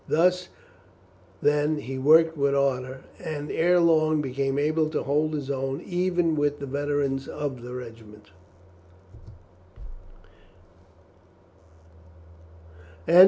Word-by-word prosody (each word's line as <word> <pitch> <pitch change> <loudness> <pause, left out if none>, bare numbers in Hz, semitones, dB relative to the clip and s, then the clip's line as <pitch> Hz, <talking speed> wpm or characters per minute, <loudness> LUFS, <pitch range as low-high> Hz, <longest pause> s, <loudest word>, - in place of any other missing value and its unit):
Thus, 180 +3 +2 1.0
then, 150 +1 +2
he 130 +1 -6
worked 160 +4 +5
with 140 -1 +1
ardour, 130 -1 -1 0.2
and 150 -2 -5
ere 175 +2 +3
long 155 -2 +3
became 135 0 -2
able 155 +2 +1
to - - -2
hold 150 +3 0
his 140 -2 -5
own 135 +1 -2
even 175 -3 0
with 145 -1 0
the 140 - -5
veterans 140 -1 -1
of 145 -4 -5
the 125 +1 -8
regiment. 110 -4 -11
145 Hz, 100 wpm, -25 LUFS, 135-155 Hz, 1.0 s, worked